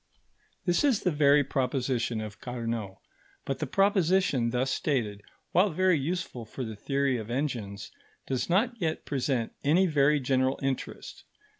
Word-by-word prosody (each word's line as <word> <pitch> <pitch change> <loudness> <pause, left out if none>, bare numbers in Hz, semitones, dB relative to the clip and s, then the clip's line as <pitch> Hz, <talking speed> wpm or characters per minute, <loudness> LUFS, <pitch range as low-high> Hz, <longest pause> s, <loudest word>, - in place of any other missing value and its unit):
This 175 +5 +2
is 270 -7 +2
the 180 - +2
very 145 -1 +5
proposition 125 -4 -1
of 110 0 -8
Carnot; 115 -5 -4 0.5
but 135 - -3
the 155 - -2
proposition 185 - +2
thus 125 +3 0
stated, 110 -10 -1 0.3
while 185 +4 +4
very 185 -1 +2
useful 155 -5 -3
for 120 +4 -6
the 110 -2 -5
theory 135 +4 0
of 110 -1 -6
engines, 120 -7 -3 0.3
does 130 +3 -2
not 215 +8 +2
yet 160 -2 -1
present 130 -4 -1
any 165 +6 +4
very 150 -3 +3
general 130 0 +1
interest. 135 -1 -4
135 Hz, 145 wpm, -28 LUFS, 120-160 Hz, 0.5 s, very